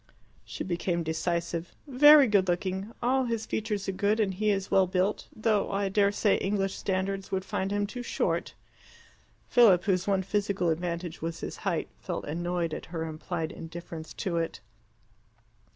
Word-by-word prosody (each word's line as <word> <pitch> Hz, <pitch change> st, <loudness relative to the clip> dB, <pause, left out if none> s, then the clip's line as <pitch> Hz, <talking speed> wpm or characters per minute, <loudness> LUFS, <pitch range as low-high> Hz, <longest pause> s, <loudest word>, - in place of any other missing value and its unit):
She -, -, -6 dB
became 175 Hz, -1 st, -1 dB
decisive. 170 Hz, +1 st, -2 dB
"Very 295 Hz, +1 st, +8 dB
good 200 Hz, -5 st, +3 dB
looking. 190 Hz, +3 st, -1 dB
All 260 Hz, +2 st, +2 dB
his 230 Hz, -2 st, -2 dB
features 210 Hz, -3 st, -2 dB
are -, -, +1 dB
good, 205 Hz, +3 st, +1 dB
and 200 Hz, -3 st, +1 dB
he 210 Hz, +3 st, 0 dB
is 195 Hz, -2 st, -1 dB
well 190 Hz, -1 st, +5 dB
built 185 Hz, +2 st, 0 dB
though 215 Hz, -2 st, 0 dB
I 200 Hz, 0 st, 0 dB
dare 200 Hz, 0 st, +3 dB
say 205 Hz, 0 st, +2 dB
English 195 Hz, -1 st, -1 dB
standards 190 Hz, 0 st, -2 dB
would 190 Hz, -1 st, -1 dB
find 190 Hz, -, -2 dB
him 205 Hz, 0 st, +1 dB
too 245 Hz, +5 st, -6 dB
short." 245 Hz, -, -1 dB, 0.9 s
Philip, 200 Hz, -8 st, +6 dB
whose 185 Hz, -1 st, 0 dB
one 195 Hz, -1 st, +2 dB
physical 200 Hz, -3 st, 0 dB
advantage 170 Hz, 0 st, -3 dB
was 165 Hz, 0 st, -4 dB
his -, -, -5 dB
height, -, -, -1 dB
felt -, -, -4 dB
annoyed 170 Hz, +1 st, -2 dB
at -, -, -6 dB
her 165 Hz, -1 st, -4 dB
implied 160 Hz, +1 st, -4 dB
indifference 165 Hz, -1 st, -8 dB
to 180 Hz, -4 st, -2 dB
it. 165 Hz, -1 st, -2 dB
190 Hz, 165 wpm, -28 LUFS, 175-205 Hz, 0.9 s, Very